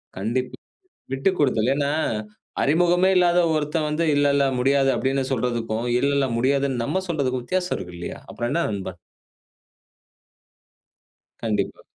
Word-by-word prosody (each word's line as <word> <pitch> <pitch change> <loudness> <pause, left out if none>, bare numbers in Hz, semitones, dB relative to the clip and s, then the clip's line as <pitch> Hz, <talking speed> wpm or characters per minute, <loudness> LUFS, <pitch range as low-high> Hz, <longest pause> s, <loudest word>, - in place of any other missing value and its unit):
கண்டிப்பா. 120 +6 -2 0.6
விட்டுக்கொடுத்தல். 135 - +1
ஏன்னா, 140 0 0 0.7
அறிமுகமே 175 +5 +3
இல்லாத 175 -1 +4 0.2
ஒருத்தன் 155 +1 -1
வந்து 155 +2 0
இல்ல, 145 0 +3
இல்ல 140 -1 +3
முடியாது 135 +1 +3
அப்படின்னு 135 0 0
சொல்றதுக்கும், 115 -1 -1
இல்ல, 140 +2 +1
இல்ல 135 -2 +2
முடியாதுன்னு 135 -1 +1
நம்ம 190 +9 -1
சொல்றதுக்கும் 130 -6 -1
வித்தியாசம் 180 +4 -1
இருக்கு 90 -1 -8
இல்லையா? 85 - -6
அப்புறம் 120 +1 -3
என்ன 170 +3 +1
நண்பன். 95 -3 -5 2.5
கண்டிப்பா. 105 -3 -2
135 Hz, 120 wpm, -23 LUFS, 120-155 Hz, 2.5 s, இல்லாத